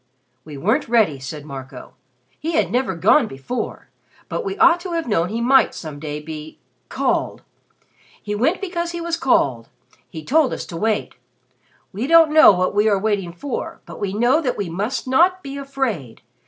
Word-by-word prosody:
"We 150 -1 -10
weren't 220 - 0
ready," 215 - +2
said 145 +3 -7
Marco. 135 -3 -9 0.5
"He 330 +2 -3
had 320 - +1
never 245 -6 0
gone 215 - +4
before; 135 - -6 0.4
but - - -3
we 390 -1 -4
ought 340 +1 +5
to 355 0 -6
have 330 -4 -2
known 175 -6 +1
he 225 +3 -3
might 265 +3 +4
some 155 -3 -8
day 150 0 -5
be 155 0 -9 0.3
called. - - -1 0.8
He 210 - -5
went 265 - 0
because 345 -3 -3
he 345 - -4
was 335 0 -2
called. 135 - +1 0.4
He 160 -2 -9
told 300 -2 +2
us - - -5
to 170 - -9
wait. 215 +2 -1 0.8
We 220 +7 -3
don't 325 -1 +6
know 315 -6 +9
what 185 -1 0
we 210 +2 +3
are 200 - +3
waiting 195 -3 -1
for, 240 +10 -5
but - - -10
we 200 -2 -2
know 240 +9 +2
that 255 -6 -2
we 195 -5 -3
must 210 +10 -3
not 355 +8 +3
be 275 -1 -7
afraid. 265 - -4
220 Hz, 180 wpm, -21 LUFS, -, 0.8 s, know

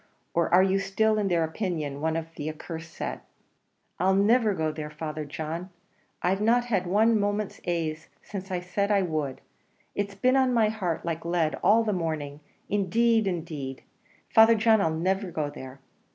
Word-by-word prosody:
or 170 -1 +1
are 180 +2 +6
you 195 0 +2
still, 215 +2 +1
in 205 - 0
their 170 -3 +2
opinion, 160 -5 -3
one 160 0 0
of 165 -1 -2
their 155 +1 -4
accursed 165 +1 -8
set?" - - -5 0.8
"I'll 190 +1 +3
niver 215 +1 +3
go 160 -2 0
there, 155 -1 -6
Father 150 0 -5
John. 160 +5 -5 0.5
I've 190 +3 +1
not 240 +3 +3
had 195 -7 0
one 215 +4 +3
moment's 205 0 -2
ase 160 -2 -2
since 195 -1 -7
I 180 -1 -2
said 190 +3 -1
I 200 -2 +3
would; 155 -6 -3 0.5
it's 200 0 -3
been 255 +6 +2
on 260 -2 +3
my 220 -2 +4
heart 185 -8 -3
like 165 -1 -3
lead 170 -2 0
all 215 +5 +5
the 215 -2 0
morning; 155 -5 -3 0.3
indeed, 220 +3 +2
indeed, 155 -7 -4 0.4
Father 225 +1 +6
John, 220 -1 +4
I'll 165 - +2
niver 185 +4 -1
go 150 -4 -3
there." 130 0 -10
180 Hz, 175 wpm, -27 LUFS, 160-210 Hz, 0.8 s, are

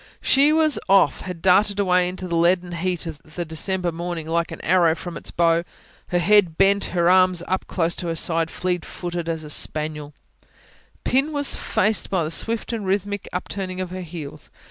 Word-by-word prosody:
She 280 +3 +5
was 310 -6 +3
off, 195 -1 +4
had 180 -3 -7
darted 200 +2 +4
away 180 -2 +3
into 185 0 -6
the 170 - -2
leaden 175 +1 +2
heat 175 +1 -2
of 160 -3 -7
the 165 +2 -6
December 175 +3 -2
morning, 170 -1 -5
like 170 +1 0
an 165 - -7
arrow 170 -2 +3
from 175 +1 -7
its - - -5
bow, 170 0 +2 0.4
her 175 - 0
head 180 -2 +3
bent, 200 +1 +3
her 170 -1 0
arms 185 -1 +4 0.2
close 170 -1 0
to 175 - -4
her 165 - -2
sides, 165 0 +1
fleet 180 -2 -2
footed 175 -1 -5
as 160 -1 -3
a 150 - -9
spaniel: 150 -1 -4 0.9
Pin 275 +4 +1
was 285 -2 0
faced 215 -1 0
by 185 -3 +1
the 155 - -3
swift 225 +6 -1
and 225 -2 -3
rhythmic 200 +1 -2
upturning 185 0 -4
of 185 -1 -4
her 185 0 -5
heels. 160 -4 -8
180 Hz, 190 wpm, -22 LUFS, 165-195 Hz, 0.9 s, She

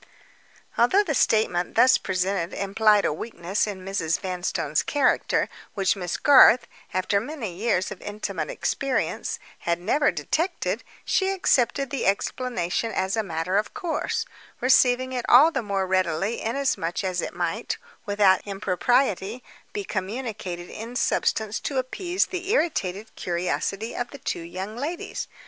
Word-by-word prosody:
Although 370 - +5
the 325 -6 -1
statement 195 -8 +1
thus 255 0 +6
presented 185 -2 -1
implied 205 +1 +3
a - - +1
weakness 190 +2 -2
in 190 -3 -6
Mrs. 170 -5 0
Vanstone's 180 -5 -1
character 285 -3 +1 0.3
which 195 -1 +2
Miss 180 -3 -3
Garth, 260 -4 +7 0.3
after 185 +2 +1
many 235 - -5
years 190 -3 0
of - - -8
intimate 200 -6 -4
experience, 275 -1 -1 0.2
had 170 0 -1
never 280 +11 +2
detected, 350 +4 -1 0.2
she 380 -1 +2
accepted 275 -8 +1
the 275 - -1
explanation 225 0 -1
as 190 0 -1
a 220 - +1
matter 175 0 -1
of 210 - -1
course; 325 -4 -2 0.3
receiving 255 0 +4
it 250 -1 -2
all 290 +7 +8
the 270 - -1
more 200 -3 -1
readily 185 +2 0
inasmuch 225 -8 -1
as 185 -2 -1
it - - -5
might, - - -2 0.3
without 200 -2 +4
impropriety, 205 +3 0 0.3
be 415 -1 -3
communicated 195 - -4
in 230 +3 -7
substance 220 -3 0
to 275 - -3
appease 350 +8 0
the 370 0 -5
irritated 220 - 0
curiosity 185 +5 -2
of 240 - -3
the 280 - -10
two 250 - -3
young 185 +5 -6
ladies. 300 +8 -4
210 Hz, 140 wpm, -25 LUFS, 185-255 Hz, 0.3 s, all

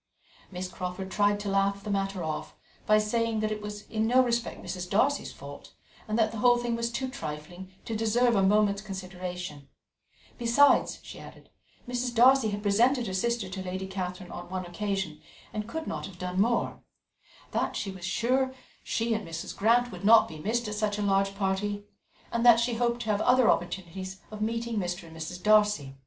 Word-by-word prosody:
Miss 185 0 -4
Crawford 180 +1 -5
tried 205 0 +2
to 205 - -3
laugh 195 0 +1
the 210 - -4
matter 195 -2 -1
off 155 -1 -4 0.3
by 215 - +6
saying 225 +1 0
that 215 0 0
it 210 0 -3
was 210 0 -6
in 220 0 -1
no 255 +2 +5
respect 235 -1 -1
Mrs. 180 -1 -5
Darcy's 270 +9 +2
fault, - - -11 0.3
and 215 +1 -1
that 220 -1 +3
the 225 - -5
whole 245 +1 +5
thing 240 -1 -1
was 235 0 -2
too 260 +2 -2
trifling 175 - -7
to 225 - -3
deserve 230 +2 +2
a 195 - +4
moment's 200 +1 +3
consideration; 180 -6 -6 0.7
besides, 240 +5 +4
she - - -10
added, - - -13 0.4
Mrs. 245 0 -2
Darcy 255 0 +6
had 205 0 -4
presented 235 +5 +3
her 190 - -4
sister 235 +2 0
to 190 0 -5
Lady 185 +1 -4
Catherine 185 -1 -5
on 175 - -8
one 185 0 -3
occasion, 190 -3 -3 0.3
and 210 -1 -3
could 320 +3 -4
not - - -4
have 190 -3 -12
done 180 +1 -1
more; 235 +2 +1 0.7
that - - -1
she 195 - -3
was 190 -2 -11
sure 260 +6 +1 0.3
she 230 0 0
and 215 -4 -3
Mrs. 165 0 -6
Grant 240 +4 +3
would 180 0 -9
not 225 +2 +7
be 155 - -9
missed 225 +7 -1
at 210 - -3
such 210 -1 -1
a 210 - -1
large 195 0 +2
party, 200 +1 -1 0.5
and 235 0 0
that 240 -2 +8
she 235 +1 +1
hoped 235 +1 0
to 215 - 0
have 205 0 0
other 250 -1 +5
opportunities 185 +2 -4
of 215 0 -7
meeting 230 +1 -1
Mr. 175 -1 -3
and 160 - -13
Mrs. 170 +3 -6
Darcy. 210 -10 +3
205 Hz, 195 wpm, -28 LUFS, 185-230 Hz, 0.7 s, that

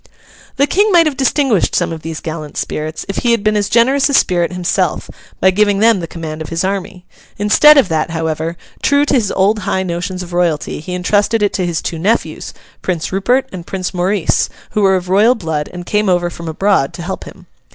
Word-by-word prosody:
The 280 - +3
King 405 +7 +2
might 340 -2 +5
have 305 -3 0
distinguished 265 - +1
some - - 0
of 160 - -7
these 160 0 -6
gallant 155 -2 -6
spirits, 155 +1 -4
if 195 - -4
he 240 -1 +2
had 230 -3 0
been 215 0 +2
as 205 -1 0
generous 265 +5 +3
a 280 - +2
spirit 175 -6 +2
himself, 180 -1 -1 0.3
by 190 - +4
giving 205 +1 +2
them 220 0 +4
the 165 - -5
command 160 -2 -7
of 160 - -6
his 165 +2 -2
army. 190 -1 -4 0.3
Instead 255 +9 +6
of 270 - +5
that, 160 0 0
however, 160 0 -3 0.2
true 285 +1 +3
to - - -1
his 230 -7 +1
old 205 +3 +2
high 190 -2 -1
notions 180 +1 -4
of 175 0 -10
royalty, 175 -4 -1
he 180 +4 -5
entrusted 205 +4 +1
it 205 - +1
to 185 -3 -1
his 165 -2 -2
two 165 - -4
nephews, 215 +7 -1 0.3
Prince 175 -4 -3
Rupert 240 +8 +1
and 180 -2 -8
Prince 185 -1 -4
Maurice, 185 0 0 0.2
who 210 - 0
were 195 -1 +4
of 180 -1 -3
royal 210 +7 +4
blood 160 -7 -3
and 175 0 -8
came 210 +1 0
over 175 -1 +1
from 170 -1 -9
abroad 160 -3 +1
to 170 - -7
help 190 +2 -5
him. - - -13
190 Hz, 215 wpm, -16 LUFS, 170-215 Hz, 0.3 s, Instead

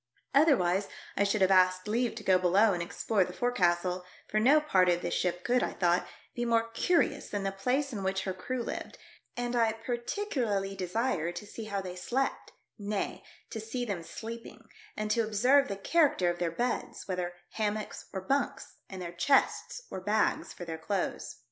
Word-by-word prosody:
Other 290 0 +6
wise 180 +3 +1 0.3
I 200 - +3
should 200 0 +1
have 190 0 +5
asked 185 0 +4
leave 235 +2 0
to 220 - -7
go 185 -2 +4
below 195 +4 +4
and 175 - -2
explore 195 +4 +1
the 180 - -7
forecastle, 180 -6 +1 0.2
for 215 - +1
no 275 +8 +6
part 190 -12 +3
of 175 0 +1
this - - -1
ship 180 0 -1
could, 245 +1 +2
I - - -1
thought, 175 -1 +2 0.3
be 240 - -2
more 230 -1 +2
curious 335 +9 +1
than 205 -1 -2
the 195 - 0
place 255 +8 0
in 205 - -3
which 190 0 -1
her 190 - -2
crew 240 +7 -3
lived, - - -5 0.4
and 245 0 -1
I 225 -2 +3
par 230 +2 -3
ticularly 235 - -2
desired 185 -2 -1
to 175 - -6
see 220 +2 -8
how 200 -2 -2
they 180 -1 -6
slept, 255 +9 -2 0.3
nay, 205 0 -3 0.3
to 225 - -4
see 235 +3 -3
them 200 -6 -3
sleeping 230 +7 -8 0.3
and 215 0 -1
to 230 - +3
observe 250 +6 +4
the 200 - -4
character 285 - +3
of 175 - -7
their 175 -1 +1
beds, 240 +9 -3
whether 180 -2 -2 0.2
hammocks 215 -1 -3
or 190 - -4
bunks, 275 +6 -1
and 190 -2 -6
their 170 0 -6
chests 275 - +2
or 185 - -5
bags 210 +3 +1
for 175 - -8
their 160 -1 -5
clothes. 190 +3 -2
205 Hz, 190 wpm, -30 LUFS, 185-240 Hz, 0.4 s, Other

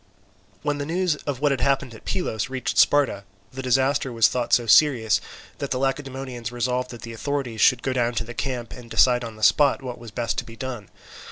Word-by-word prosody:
When 145 -1 -1
the 145 - -2
news 175 0 +1
of 140 -2 -3
what 145 -1 +3
had 135 - -1
happened 135 -3 +1
at 110 - -14
Pylos 135 - -2
reached 130 -1 -2
Sparta, 140 -9 +3 0.3
the 130 - -5
disaster 135 +2 +1
was 115 -2 +4
thought 125 -2 -2
so 120 - +4
serious 115 -1 +4 0.4
that 140 - -3
the 125 - -1
Lacedaemonians 135 -3 -3
resolved 125 +1 -1
that 120 -2 -10
the 115 - -7
authorities 130 -2 -3
should 125 -1 +4
go 130 - -1
down 120 -1 0
to 115 - 0
the 120 +1 -9
camp, 125 -2 -4
and 120 -2 -11
decide 125 +1 +4
on 115 -2 -7
the 110 - -10
spot 135 +5 +4
what 125 -2 -6
was 120 -1 -10
best 115 +2 -2
to - - -4
be 115 - -12
done. 120 -5 -6
125 Hz, 215 wpm, -24 LUFS, 115-135 Hz, 0.4 s, was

